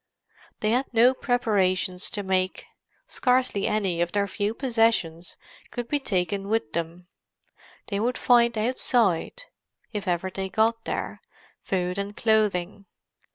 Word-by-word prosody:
They 215 - +1
had 255 +3 0
no 240 +2 +5
preparations 195 -8 0
to 205 - -2
make. 185 -1 -1 0.4
Scarcely 250 -5 +1
any 190 -5 0
of 175 0 -1
their 200 -1 +1
few 205 +2 -2
possessions 225 - +1 0.3
could 240 -1 -5
be 290 - 0
taken 195 -4 -1
with 220 -8 -1
them; 170 +2 -4 0.8
they 200 -2 -1
would 240 +3 0
find 235 -2 +4
outside—if 225 - -1
ever 180 +1 -1
they 190 0 -4
got 225 +3 +1
there—food 180 0 -4
and 200 +1 -5
clothing. 205 -3 +1
205 Hz, 120 wpm, -26 LUFS, 185-230 Hz, 0.8 s, no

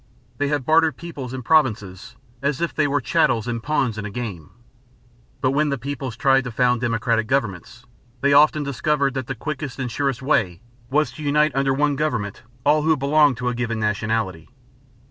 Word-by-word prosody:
They 145 - +1
had 145 -3 -1
bartered 160 +1 +3
peoples 145 -7 -7
and 130 -2 -6
provinces 110 - +1 0.3
"as 140 -1 -1
if 170 - -1
they 150 -2 +1
were 145 0 0
chattels 115 -2 +1
and 120 -1 -3
pawns 130 -5 -1
in 105 - -5
a - - -4
game." 100 -8 -6 0.9
But 130 - +2
when 150 +2 +1
the 140 - -1
peoples 135 -4 -5
tried 135 -1 +3
to 125 - -4
found 125 +1 +1
democratic 115 -1 0
governments, 120 -2 -2 0.4
they 140 +1 +3
often 150 +1 +5
discovered 140 0 0
that 130 -2 -4
the 135 - -4
quickest 150 0 -5
and 125 -3 -3
surest 135 0 -1
way 95 - +1 0.3
was 150 +3 +1
to 155 - -9
unite 150 +1 +3
under 135 0 +1
one 145 0 +1
government 120 -9 -2 0.2
all 150 +1 +4
who 160 0 +2
belonged 140 -1 +3
to 125 0 -1
a - - -2
given 115 -2 -2
nationality. 105 -5 -2
135 Hz, 185 wpm, -22 LUFS, 115-145 Hz, 0.9 s, often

